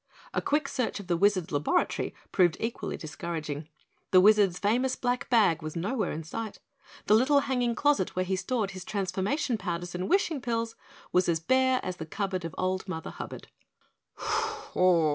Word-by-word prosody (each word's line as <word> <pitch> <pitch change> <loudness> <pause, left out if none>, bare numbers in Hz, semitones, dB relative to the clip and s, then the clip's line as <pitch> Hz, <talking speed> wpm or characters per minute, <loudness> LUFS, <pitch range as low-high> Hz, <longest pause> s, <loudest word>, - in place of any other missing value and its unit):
A - - 0
quick 295 0 +1
search 250 -6 -2
of 200 - -8
the 175 -1 +1
Wizard's 185 -1 +2
laboratory 145 0 0 0.2
proved 175 -3 +3
equally 230 +1 -3
discouraging. 155 -2 -5 0.4
The 185 - +7
Wizard's 200 -2 +5
famous 245 +7 +1
black 245 0 -1
bag 210 -10 +4
was 155 +1 -6
nowhere 200 +4 -1
in 160 - -4
sight, 220 +6 -5 0.5
the 210 - +4
little 270 +6 +5
hanging 245 -3 0
closet 285 -8 +2
where 185 0 0
he 190 +1 0
stored 200 +2 -1
his 185 -1 -7
transformation 200 +6 -1
powders 175 -2 -3
and 180 +1 -3
wishing 345 -7 +2
pills 230 -1 -2 0.4
was 175 -3 +2
bare 260 +7 +3
as 185 -1 -4
the 160 - -6
cupboard 190 0 -2
of 165 - -6
old 185 +1 -1
Mother 160 -3 -5
Hubbard. - - -8
195 Hz, 160 wpm, -28 LUFS, 175-240 Hz, 0.5 s, The